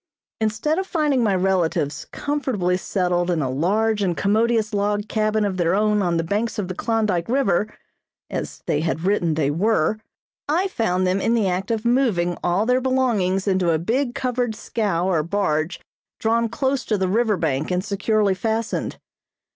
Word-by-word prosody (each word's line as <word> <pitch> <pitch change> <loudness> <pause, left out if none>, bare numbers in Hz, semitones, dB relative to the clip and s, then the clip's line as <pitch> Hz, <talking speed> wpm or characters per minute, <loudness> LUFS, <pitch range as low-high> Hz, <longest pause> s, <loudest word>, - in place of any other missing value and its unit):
Instead 220 - 0
of 380 - -3
finding 300 -8 +1
my 205 -3 +2
relatives 180 -6 0
comfortably 255 -11 -1
settled 180 -2 0
in 170 -2 +1
a 135 -4 -1
large 210 +9 +1
and 180 -4 0
commodious 220 +1 +1
log 205 +1 0
cabin 215 -1 +1
of 190 -2 -2
their 175 0 +2
own 210 0 +2
on 175 -3 +1
the 165 - 0
banks 210 +7 -2
of 205 -3 -2
the 185 - -4
Klondyke 215 -3 0
River, 215 -6 +1 0.6
as - - -5
they 145 - 0
had 160 0 -2
written 180 -5 +1
they 145 -2 +1
were, 210 +3 +1 0.5
I 350 +6 +2
found 185 - 0
them 185 +2 +1
in 230 - +2
the 220 -4 +2
act 185 +1 -2
of 225 0 -1
moving 225 -9 +2
all 180 +4 +1
their 250 +2 +2
belongings 225 -8 +1
into 185 -3 +2
a 160 - +3
big 240 - -1
covered 245 -3 -1
scow 205 -6 -1
or 175 -5 +2
barge 165 -1 -1 0.4
drawn 230 +1 +1
close 265 +2 -1
to 215 - 0
the 190 -1 0
river 215 +1 +2
bank 155 -3 -1
and 180 +1 -1
securely 210 0 +1
fastened. 220 +3 -2
205 Hz, 175 wpm, -22 LUFS, 180-230 Hz, 0.6 s, a